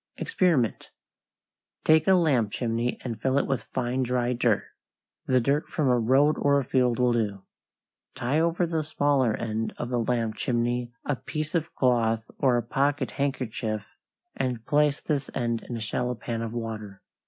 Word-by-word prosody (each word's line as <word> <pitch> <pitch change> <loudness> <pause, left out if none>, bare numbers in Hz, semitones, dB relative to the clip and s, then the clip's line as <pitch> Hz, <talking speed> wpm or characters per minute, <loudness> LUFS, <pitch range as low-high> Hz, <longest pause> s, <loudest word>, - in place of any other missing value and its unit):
=EXPERIMENT= 150 - +1 0.9
Take 155 0 +4
a 190 - +6
lamp 135 - +2
chimney 120 +1 -1
and 115 -4 -5
fill 130 +1 +1
it - - +2
with 135 -2 -2
fine, 125 +1 -2
dry 125 -1 0
dirt. 120 -3 +2 0.6
The 130 -1 +4
dirt 140 +5 +1
from 150 -5 0
a 125 -1 +4
road 135 +6 +3
or 140 0 +3
a - - -1
field 125 -2 +1
will 125 -1 +3
do. 105 -4 -1 0.7
Tie 130 +6 0
over 170 +2 +2
the 165 -2 -1
smaller 145 -6 +1
end 110 -1 -3
of 120 - -4
the 125 -1 0
lamp 115 -2 -1
chimney 120 0 -1
a 145 - 0
piece 155 +3 -5
of 165 -2 -1
cloth 115 -3 +1
or 130 -3 +3
a 120 - -1
pocket 140 +3 0
handkerchief, 115 -6 -2 0.5
and 125 -4 -2
place 150 0 +2
this 145 -3 -2
end 115 -2 -1
in 120 - -3
a - - -5
shallow 125 +3 -2
pan 115 0 -4
of 115 -1 -3
water. 110 -4 -6
125 Hz, 170 wpm, -26 LUFS, 115-140 Hz, 0.9 s, a